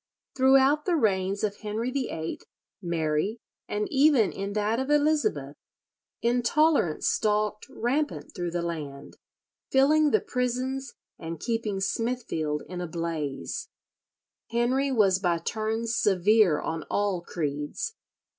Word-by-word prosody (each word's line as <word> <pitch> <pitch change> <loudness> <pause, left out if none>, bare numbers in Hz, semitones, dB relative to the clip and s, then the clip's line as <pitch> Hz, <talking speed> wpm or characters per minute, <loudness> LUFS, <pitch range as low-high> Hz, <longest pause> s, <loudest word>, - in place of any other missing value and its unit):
Throughout 270 +3 +4
the 360 - +2
reigns 195 - +1
of 205 -1 -1
Henry 220 +3 -3
VIII, 240 -12 -3 0.4
Mary, 170 +4 -1 0.3
and 210 0 -2
even 275 -6 +4
in 200 +1 -4
that 215 +3 0
of 265 +1 -2
Elizabeth, 295 - +1 0.7
intolerance 245 - +2
stalked 210 +2 0
rampant 275 +4 -2
through 175 -1 -3
the 170 0 -2
land, 150 -5 -6 0.5
filling 300 +3 +4
the - - +3
prisons 255 +2 -2 0.2
and 165 -1 -6
keeping 225 -3 -2
Smithfield 195 -8 -2
in 180 0 -5
a 175 - -3
blaze. 165 - -4 0.8
Henry 255 +4 +1
was 200 -6 +3
by 175 -3 +1
turns 220 +5 -2
severe 200 -3 +4
on 160 0 -3
all 200 -3 0
creeds. 150 - -3
215 Hz, 115 wpm, -27 LUFS, 170-260 Hz, 0.8 s, Throughout